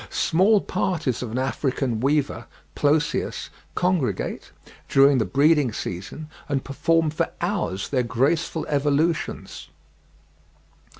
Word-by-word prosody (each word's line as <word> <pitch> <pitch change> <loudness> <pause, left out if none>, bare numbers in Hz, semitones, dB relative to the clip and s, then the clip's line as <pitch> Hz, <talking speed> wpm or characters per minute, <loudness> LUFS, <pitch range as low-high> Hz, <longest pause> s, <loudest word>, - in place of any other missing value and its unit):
Small 195 +5 +3
parties 155 -10 -1
of 125 - -4
an 115 - -4
African 130 -2 -1
weaver 140 +3 0 0.3
(Ploceus) 150 +1 0 0.3
congregate, 170 - -1 0.4
during 135 -1 +5
the 110 - +1
breeding 145 - +3
season, 100 - -6 0.2
and 140 -2 0
perform 160 +3 +1
for 165 +2 -1
hours 175 - -2
their 130 -3 +1
graceful 140 +8 0
evolutions. 150 +3 -1
145 Hz, 105 wpm, -24 LUFS, 130-165 Hz, 0.4 s, during